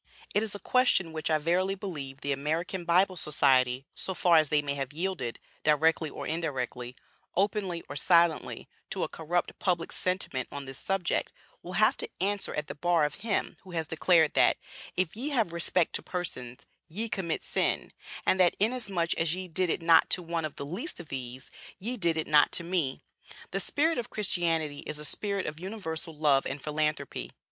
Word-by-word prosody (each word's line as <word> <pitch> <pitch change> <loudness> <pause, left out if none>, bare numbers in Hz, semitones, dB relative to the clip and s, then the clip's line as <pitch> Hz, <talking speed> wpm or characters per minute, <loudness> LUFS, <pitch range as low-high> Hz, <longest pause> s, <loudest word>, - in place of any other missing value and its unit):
It 205 - +3
is 215 -2 -3
a - - -6
question 195 -8 +3
which 155 0 -3
I 155 - +4
verily 180 +5 +1
believe 145 -9 -6
the 145 - -1
American 165 +6 -2
Bible 185 +2 +4
Society, 135 -5 +3
so 190 - -3
far 175 -2 +5
as 155 -2 +4
they 150 -1 +3
may 140 -1 -1
have 135 -1 -3
yielded, 165 -8 -2 0.3
directly 155 +1 +3
or - - -7
indirectly, 130 -6 -3 0.4
openly 195 -3 0
or 145 - -7
silently, 170 +2 +3 0.2
to - - -1
a - - 0
corrupt 170 +2 -2
public 175 -3 0
sentiment 180 -9 -1
on 140 -1 -6
this 135 0 -5
subject, 195 -3 0 0.3
will - - -8
have - - +4
to 460 - -4
answer 200 +1 +1
at 150 - -2
the - - -6
bar 165 +1 +2
of 150 - -5
Him 220 -3 -1
who 185 - -12
has 165 -1 -1
declared, 160 0 +3
that, - - +4 0.4
'If 185 -1 0
ye 260 +7 -3
have 225 - +1
respect 170 0 +1
to - - +1
persons, 125 -9 -5 0.2
ye 215 +8 -3
commit 185 -6 -2
sin,' - - 0 0.3
and 185 - +3
that 180 -2 +5
'Inasmuch 200 -6 +1
as 165 0 +1
ye 185 0 -5
did 180 +1 0
it 165 - -1
not 165 -1 +6
to 180 - +3
one 165 -1 -2
of 155 - -6
the 140 - -5
least 185 - -5
of 170 -4 -9
these, 130 0 -6 0.3
ye 230 +6 -3
did 170 -7 +1
it 160 - 0
not 150 -1 +5
to - - +2
me.' 170 -6 -1 0.5
The 195 - 0
spirit 300 - +1
of 235 - -4
Christianity 165 -7 0
is 150 - -5
a 150 - -5
spirit 200 +4 -1
of 150 +1 -5
universal 170 -5 -5
love 145 -3 +3
and 135 +2 -4
philanthropy. 150 +1 -2
165 Hz, 190 wpm, -29 LUFS, 150-185 Hz, 0.5 s, not